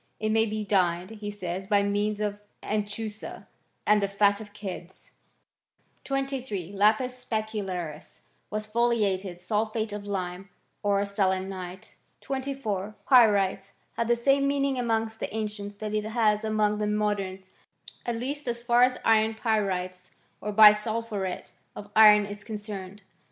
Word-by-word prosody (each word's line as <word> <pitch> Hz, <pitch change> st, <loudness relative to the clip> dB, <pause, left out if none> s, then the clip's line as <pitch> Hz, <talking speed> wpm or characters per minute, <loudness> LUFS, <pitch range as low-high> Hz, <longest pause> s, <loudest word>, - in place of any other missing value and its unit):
It 215 Hz, -, -1 dB
may 225 Hz, +1 st, +3 dB
be 215 Hz, 0 st, -3 dB
dyed, 180 Hz, -1 st, +1 dB
he 210 Hz, -2 st, -6 dB
says, 190 Hz, -2 st, -5 dB
by 205 Hz, -1 st, +3 dB
means 205 Hz, +1 st, 0 dB
of 205 Hz, -1 st, -2 dB, 0.2 s
anchusa 210 Hz, 0 st, -4 dB, 0.4 s
and 210 Hz, 0 st, +4 dB
the 200 Hz, -, +1 dB
fat 200 Hz, +1 st, +2 dB
of 205 Hz, -1 st, -10 dB
kids, 190 Hz, -3 st, -8 dB, 0.9 s
23. 265 Hz, -9 st, -3 dB
Lapis 235 Hz, +5 st, +2 dB
specularis 195 Hz, -9 st, -4 dB, 0.3 s
was 215 Hz, +1 st, -3 dB
foliated 210 Hz, -5 st, 0 dB
sulphate 215 Hz, +3 st, -1 dB
of 205 Hz, 0 st, -6 dB
lime, 185 Hz, -1 st, -4 dB, 0.3 s
or 200 Hz, 0 st, +2 dB
selenite. 190 Hz, -2 st, -2 dB, 0.3 s
24. 260 Hz, -7 st, -3 dB
Pyrites 200 Hz, -6 st, +4 dB, 0.2 s
had 230 Hz, -, -1 dB
the 240 Hz, -, +4 dB
same 275 Hz, +3 st, +2 dB
meaning 275 Hz, -2 st, +1 dB
among 225 Hz, -2 st, +1 dB
the -, -, -4 dB
an 220 Hz, 0 st, -1 dB
cients 205 Hz, -1 st, -8 dB
that 215 Hz, 0 st, -5 dB
it 215 Hz, 0 st, 0 dB
has 220 Hz, -1 st, +1 dB
among 215 Hz, -1 st, +1 dB
the 210 Hz, -, 0 dB
moderns; 200 Hz, -3 st, -2 dB, 0.5 s
at 240 Hz, -, -2 dB
least 270 Hz, +4 st, -4 dB
as 235 Hz, 0 st, -3 dB
far 240 Hz, 0 st, +4 dB
as 250 Hz, 0 st, +4 dB
iron 220 Hz, 0 st, +4 dB
pyrites 185 Hz, -5 st, -1 dB, 0.3 s
or 210 Hz, -, -3 dB
bisulphuret 210 Hz, -2 st, +3 dB, 0.2 s
of 205 Hz, 0 st, -9 dB
iron 210 Hz, -1 st, +8 dB
is 205 Hz, 0 st, -8 dB
concerned. 205 Hz, -2 st, -7 dB
210 Hz, 140 wpm, -27 LUFS, 200-225 Hz, 0.9 s, iron